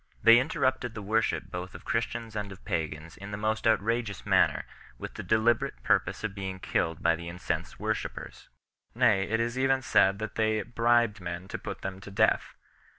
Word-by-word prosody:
They 115 +1 +9
inter 135 +6 -3
rupted 130 -3 +1
the 105 - -6
worship 110 +3 0
both 90 +1 -6
of - - -11
Christians 115 -2 -2
and 105 -1 -3
of 95 - -12
pagans 80 0 -3
in 100 +1 -8
the 100 - -4
most 110 +1 0
outrageous 110 -1 0
manner - - +3 0.3
with - - -7
the - - -6
deliberate 110 - +1
purpose - - +1
of 110 -3 -2
being 95 -2 -5
killed 80 -3 -1
by 85 0 +4
the 85 +1 -7
incensed 90 +1 -4
worshippers; - - -4 0.5
nay, 110 -6 +4
it 115 +1 +1
is 120 +2 -1
even 135 0 +2
said 95 -4 +4
that 110 0 -5
they 110 -1 +1
bribed 115 -2 +2
men 85 +1 -5
to - - -4
put - - -7
them 95 0 -4
to 100 - -9
death. 100 - +1
105 Hz, 190 wpm, -29 LUFS, 95-115 Hz, 0.5 s, They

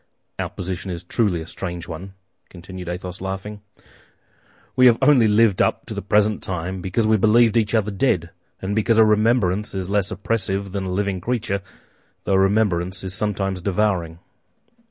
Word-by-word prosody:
Our - - -2
position 95 +1 -5
is 85 -1 -5
truly 90 -3 0
a - - -7
strange 85 -1 -6
one," 90 +4 -8 0.3
continued 90 0 -9
Athos, 90 0 -6
laughing. 95 +2 -5 1.1
"We 130 0 +6
have 115 -2 +5
only 130 -7 +5
lived 105 -2 +3
up - - 0
to - - -6
the - - -4
present 105 0 +2
time 95 +1 -4
because 95 +5 0
we 110 0 +4
believed 115 +2 +4
each 110 -1 +2
other 105 -1 +1
dead, 95 -6 0 0.3
and 100 +2 -2
because 110 +1 +2
a 110 - +7
remembrance 105 -2 +2
is 95 0 -3
less 100 -2 +1
oppressive 100 -1 -2
than 100 0 -3
a 95 - -3
living 95 -1 -1
creature, 110 -3 -2 0.6
though - - 0
a 95 - +4
remembrance 95 -3 +1
is 95 -1 -4
sometimes 95 -2 -2
devouring." 90 -4 0
95 Hz, 170 wpm, -22 LUFS, 90-105 Hz, 1.1 s, a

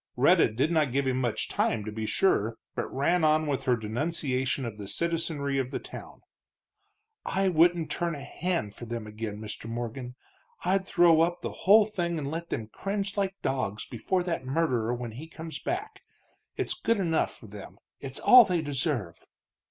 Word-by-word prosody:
Rhetta - - +5
did 130 +9 0
not 155 -6 +2
give 140 +2 +1
him 130 0 0
much 120 -3 -1
time, 105 -2 0
to 110 - -4
be 110 0 -4
sure, 115 - +2 0.2
but - - -3
ran 165 +6 +1
on 155 0 +4
with 140 -2 -2
her 125 -3 +4
denunciation 130 +3 -1
of 110 -2 -6
the 100 - -6
citizenry 155 - -1
of 130 -1 -1
the - - -3
town. - - -10 1.0
"I 195 0 +1
wouldn't 170 -1 +3
turn 170 -2 -1
a 140 - -8
hand 160 - -2
for 120 - -9
them 115 -1 -5
again, 105 0 -5
Mr. 110 +1 -7
Morgan 120 +2 -5 0.5
I'd 190 +1 +1
throw 170 -3 +5
up 175 +1 +1
the - - -3
whole 210 +3 +6
thing 175 -5 -2
and 140 -2 -3
let 165 +1 -4
them 110 - -3
cringe 200 - -3
like 195 -2 0
dogs 110 -6 -2
before 180 - -1
that 170 -5 -2
murderer 130 -5 0
when 120 -1 -4
he 135 +9 -9
comes 160 0 -7
back! 390 +4 -4 0.6
It's - - -1
good 230 0 0
enough 165 -4 0
for - - -14
them, 100 -1 -10 0.2
it's 135 -1 -7
all 250 -1 +9
they 180 -6 0
deserve." 130 - -2
145 Hz, 185 wpm, -28 LUFS, 120-170 Hz, 1.0 s, all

